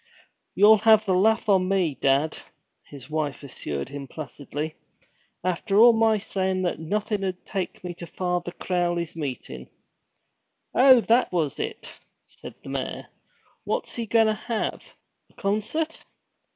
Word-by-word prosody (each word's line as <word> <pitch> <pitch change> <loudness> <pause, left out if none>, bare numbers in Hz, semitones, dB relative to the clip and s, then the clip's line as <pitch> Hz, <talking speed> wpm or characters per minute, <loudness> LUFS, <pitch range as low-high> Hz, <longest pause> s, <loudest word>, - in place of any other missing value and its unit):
'You'll 215 +2 +7
have 220 0 +5
the 190 - +1
laugh 220 +5 +3
on 190 -2 +3
me, 185 -6 +1
dad,' 140 +3 +1 0.5
his 140 -4 -11
wife 155 -2 -3
assured 75 - -5
him 140 -1 -7
placidly. 150 +1 -6 0.7
'After 185 +3 0
all 235 +2 +8
my 225 -1 +3
sayin' 190 -2 -2
that 175 - -1
nothing'd 195 +1 -2
take 190 -3 -4
me 180 -1 -5
to 170 0 -9
Father 180 -1 -2
Crowley's 175 -2 -2
meetin'!' 125 - -6 1.0
'Oh, 255 -1 +7
that 235 +3 +2
was 160 -6 -1
it?' 445 0 -5 0.3
said - - -12
the - - -9
mayor. - - -4 0.5
'What's - - -3
he 230 -1 -3
goin' 225 +1 +4
to 215 - +2
have 220 +2 -3 0.5
a - - -27
concert?' 215 +11 -2
185 Hz, 140 wpm, -25 LUFS, 155-215 Hz, 1.0 s, all